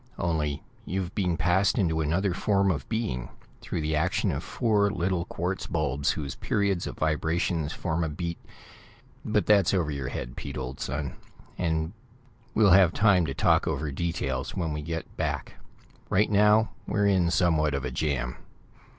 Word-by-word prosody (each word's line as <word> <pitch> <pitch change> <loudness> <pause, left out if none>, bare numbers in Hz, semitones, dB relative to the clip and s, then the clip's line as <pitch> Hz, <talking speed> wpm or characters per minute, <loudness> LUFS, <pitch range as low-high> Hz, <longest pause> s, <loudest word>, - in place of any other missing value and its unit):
Only 75 -4 -1 0.2
you've 95 0 -3
been 90 -4 0
passed 90 - +2
into 80 -6 +1
another 85 +5 +1
form 100 +1 +2
of 75 - -4
being, 70 - -2 0.3
through 80 - -3
the 75 0 0
action 75 - +1
of - - -3
four 105 -3 +2
little 90 -2 -1
quartz 90 +3 -3
bulbs 70 -4 0
whose 70 -3 -2
periods 100 -3 0
of - - -6
vibrations 80 0 0
form 85 0 -2
a 80 - -1
beat 85 +2 -4 0.8
but 105 -1 +1
that's 100 -2 +4
over 85 -5 0
your 70 -3 -3
head, - - -5
Pete, - - -6
old 65 0 -5
son, 70 0 -3 0.4
and 80 0 -1 0.6
we'll 105 -3 +5
have 90 -2 +6
time 100 -6 +4
to 70 - -4
talk - - +3
over 75 -1 -1
details 70 -4 -2
when 80 -4 -1
we 75 - -3
get 80 +1 -5
back. - - -3 0.5
Right 105 +3 +2
now, 105 0 +4 0.2
we're 105 -1 +1
in 95 -4 +3
somewhat 80 -5 +2
of 70 -1 -2
a 65 - -3
jam." 65 -3 -1
85 Hz, 165 wpm, -27 LUFS, 75-95 Hz, 0.8 s, have